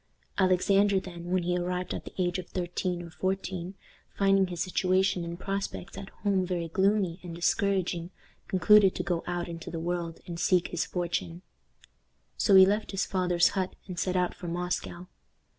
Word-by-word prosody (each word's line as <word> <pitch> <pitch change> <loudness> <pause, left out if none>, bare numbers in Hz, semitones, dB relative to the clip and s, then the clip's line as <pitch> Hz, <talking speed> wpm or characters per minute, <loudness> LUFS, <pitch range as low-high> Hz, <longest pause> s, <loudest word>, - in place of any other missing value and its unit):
Alexander, 195 +2 +4
then, 175 -2 -9
when 185 -1 +1
he 175 +1 0
arrived 180 0 -2
at - - -6
the - - -9
age 180 -1 0
of 180 - -7
thirteen 180 0 -2
or 170 - -10
fourteen, 185 0 -3 0.4
finding 195 -1 +4
his 175 -1 -6
situation 185 0 +1
and 170 +1 -6
prospects 195 -1 -4
at 195 - -8
home 195 -2 +2
very 175 -2 -2
gloomy 190 0 +1
and 175 -2 -7
discouraging, 175 -1 0 0.4
concluded 195 +1 +5
to - - -2
go 175 -2 -1
out 175 0 -2
into 165 -1 -7
the 165 - -4
world 170 -1 -3
and 170 -1 -6
seek 180 0 +2
his 175 - -1
fortune. 175 0 -3 0.9
So 200 - +4
he 190 0 +10
left 210 +3 0
his 195 -1 -1
father's 180 -2 +2
hut 185 -1 -2
and 180 -3 -6
set 185 +2 -1
out 180 -1 +1
for 175 - -8
Moscow. 175 0 -3
180 Hz, 175 wpm, -28 LUFS, 175-190 Hz, 0.9 s, he